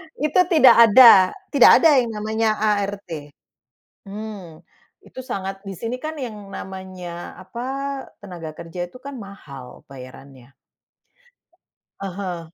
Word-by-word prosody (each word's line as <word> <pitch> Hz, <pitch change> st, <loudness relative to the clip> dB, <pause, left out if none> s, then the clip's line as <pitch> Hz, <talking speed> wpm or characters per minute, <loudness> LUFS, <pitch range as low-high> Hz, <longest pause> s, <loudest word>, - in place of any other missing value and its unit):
Itu 305 Hz, +5 st, 0 dB
tidak 315 Hz, -7 st, +6 dB
ada 210 Hz, -5 st, +7 dB, 0.2 s
tidak 280 Hz, -4 st, +7 dB
ada 300 Hz, -5 st, +6 dB
yang 240 Hz, -, -1 dB
namanya 220 Hz, +1 st, -1 dB
ART. 200 Hz, -8 st, -3 dB, 0.7 s
Hmm, 195 Hz, -6 st, -9 dB, 0.4 s
itu -, -, -11 dB
sangat 195 Hz, -6 st, -6 dB
di 195 Hz, -1 st, -9 dB
sini 235 Hz, +6 st, -5 dB
kan 310 Hz, +2 st, -6 dB
yang 215 Hz, -7 st, -8 dB
namanya, 185 Hz, -3 st, -9 dB
apa, 235 Hz, +6 st, -9 dB, 0.6 s
tenaga 165 Hz, -5 st, -9 dB
kerja 175 Hz, +1 st, -7 dB
itu 175 Hz, -, -16 dB
kan 270 Hz, 0 st, -9 dB
mahal 140 Hz, -, -12 dB
bayarannya. 130 Hz, 0 st, -14 dB, 1.4 s
Ah 195 Hz, -2 st, -5 dB
hah. 185 Hz, -4 st, -5 dB
195 Hz, 120 wpm, -21 LUFS, 175-230 Hz, 1.4 s, ada